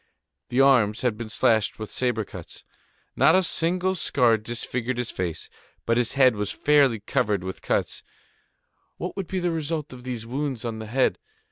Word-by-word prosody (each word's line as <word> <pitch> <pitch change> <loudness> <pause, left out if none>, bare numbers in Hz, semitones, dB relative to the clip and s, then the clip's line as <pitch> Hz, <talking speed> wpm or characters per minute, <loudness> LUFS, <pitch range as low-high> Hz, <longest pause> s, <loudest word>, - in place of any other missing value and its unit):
The 125 +2 +2
arms 120 -6 +4
had 125 -4 +1
been 110 0 -7
slashed 110 -2 +2
with 110 -1 -7
sabre 120 -4 -1
cuts. - - -11 0.5
Not 140 +6 +5
a 190 - +4
single 180 +2 +1
scar 125 -9 +2
disfigured 120 +2 -3
his 125 -2 -3
face; 90 -3 -4 0.4
but 115 - +2
his 120 -1 +1
head 130 -4 +5
was 105 -1 -2
fairly 140 -6 +3
covered 100 -1 0
with 95 0 -6
cuts; - - -1 1.0
what 180 - -5
would 195 -3 -4
be 190 - -3
the 175 -1 0
result 155 -2 -3
of 125 -1 -11
these 125 -3 -5
wounds 130 -1 -3
on 115 -1 -4
the 110 - -7
head? 130 +4 +1
125 Hz, 175 wpm, -25 LUFS, 110-145 Hz, 1.0 s, Not